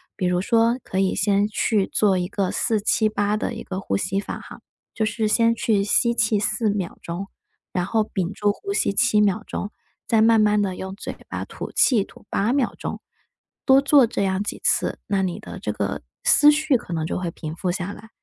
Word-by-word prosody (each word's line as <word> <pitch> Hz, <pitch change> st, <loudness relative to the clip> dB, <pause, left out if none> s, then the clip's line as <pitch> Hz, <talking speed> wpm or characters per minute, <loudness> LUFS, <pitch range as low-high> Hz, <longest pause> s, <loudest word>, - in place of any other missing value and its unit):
比 185 Hz, -, -2 dB
如 180 Hz, 0 st, +1 dB
说 230 Hz, +4 st, +2 dB
可 190 Hz, -, -3 dB
以 190 Hz, -1 st, +2 dB
先 205 Hz, +1 st, +2 dB
去 210 Hz, -2 st, +1 dB
做 195 Hz, -3 st, +2 dB
一 180 Hz, +1 st, -2 dB
个 195 Hz, -3 st, -1 dB
478 215 Hz, -1 st, +1 dB
的 230 Hz, -, -2 dB
一 -, -, -7 dB
个 190 Hz, 0 st, -5 dB
呼 100 Hz, -, -1 dB
吸 195 Hz, -, -1 dB
法 -, -, -6 dB
哈。 -, -, -12 dB, 0.3 s
就 220 Hz, -, -1 dB
是 215 Hz, +1 st, 0 dB
先 230 Hz, +2 st, +3 dB
去 215 Hz, -3 st, +1 dB
吸 235 Hz, +4 st, +3 dB
气 220 Hz, -2 st, +2 dB
4 215 Hz, +2 st, 0 dB
秒 200 Hz, -4 st, -3 dB
钟， 175 Hz, +4 st, -5 dB, 0.5 s
然 180 Hz, -1 st, 0 dB
后 220 Hz, +1 st, +1 dB
屏 190 Hz, -3 st, -3 dB
住 205 Hz, 0 st, 0 dB
呼 400 Hz, -, -7 dB
吸 200 Hz, -, +1 dB
7 220 Hz, 0 st, +3 dB
秒 210 Hz, +1 st, +1 dB
钟， 205 Hz, -, -4 dB, 0.4 s
再 225 Hz, -1 st, +3 dB
慢 225 Hz, 0 st, +5 dB
慢 210 Hz, -1 st, +3 dB
的 190 Hz, -2 st, -1 dB
用 190 Hz, +1 st, -6 dB
嘴 -, -, -7 dB
巴 -, -, -4 dB
吐 -, -, -8 dB
气 225 Hz, -7 st, +3 dB
吐 -, -, -17 dB
8 215 Hz, +6 st, 0 dB
秒 270 Hz, -4 st, +1 dB
钟。 -, -, -5 dB, 0.6 s
多 270 Hz, 0 st, +6 dB
做 280 Hz, -2 st, +5 dB
这 210 Hz, -3 st, -2 dB
样 190 Hz, +1 st, 0 dB
几 205 Hz, -, -5 dB
次， -, -, +1 dB
那 195 Hz, -1 st, +1 dB
你 180 Hz, -2 st, -3 dB
的 -, -, -9 dB
这 -, -, -3 dB
个 -, -, -3 dB, 0.2 s
思 295 Hz, 0 st, +7 dB
绪 300 Hz, -1 st, +2 dB
可 225 Hz, -, -12 dB
能 160 Hz, -1 st, -1 dB
就 -, -, -2 dB
会 175 Hz, -2 st, -3 dB
平 155 Hz, 0 st, -7 dB
复 180 Hz, +1 st, -2 dB
下 185 Hz, +1 st, -4 dB
来。 220 Hz, +1 st, -13 dB
205 Hz, 215 characters per minute, -23 LUFS, 190-225 Hz, 0.6 s, 思